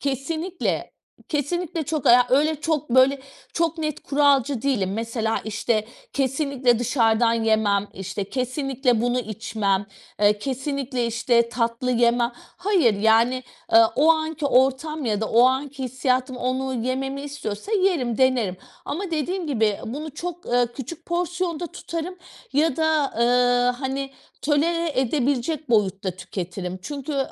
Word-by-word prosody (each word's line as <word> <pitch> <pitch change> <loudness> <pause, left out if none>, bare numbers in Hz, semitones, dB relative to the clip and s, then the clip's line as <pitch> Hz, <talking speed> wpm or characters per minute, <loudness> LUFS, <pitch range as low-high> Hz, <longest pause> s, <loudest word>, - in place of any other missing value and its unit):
Kesinlikle, 315 +6 -2 0.4
kesinlikle 330 +3 -2
çok 310 -2 -3
aya 245 +1 +7
öyle 300 +3 +2
çok, 305 -4 -1
böyle, 260 +2 +5 0.3
çok 330 0 0
net 305 -2 -3
kuralcı 280 -3 +2
değilim, 210 -9 0
mesela, 225 +1 -2
işte, 215 0 0 0.3
"Kesinlikle 270 -3 +1
dışarıdan 230 -2 +2
yemem." 220 -3 +1
işte, 195 +1 -4
"Kesinlikle 255 -2 0
bunu 245 +1 +1
içmem." 205 -2 -2 0.3
eee, 210 0 +4
"Kesinlikle 265 0 -2
işte, 235 0 +2
tatlı 235 +1 -1
yemem." 235 0 +3
Hayır, 355 - +1
yani, 230 +4 +3 0.3
eee, 225 - +8 0.2
o 315 +3 +5
anki 315 -1 -2
ortam 270 +4 +2
ya 215 -3 0
da 220 - -1
o 235 +2 +5
anki 270 +1 -1
hissiyatım 255 +1 -1
onu 260 +1 -2
yememi 270 +2 -2
istiyorsa 285 - -6
yerim, 355 - +1
denerim 250 -8 +2 0.3
ama 365 +4 -4
dediğim 340 +3 -2
gibi, 220 -8 +1
bunu 295 +7 -5
çok, 350 +2 -6
eee, 245 0 +2
küçük 300 +5 -8
porsiyonda 350 -1 -2
tutarım 335 +3 -6 0.4
ya 295 -1 +2
da, 315 -3 +1
eee, 245 +1 +3
hani, 270 0 -3 0.3
tolere 315 -1 +1
edebilecek 275 +3 -1
boyutta 195 -3 +1
tüketirim 180 0 -6
çünkü, 285 +5 -5
eee, 280 - -1
260 Hz, 130 wpm, -23 LUFS, 230-300 Hz, 0.4 s, eee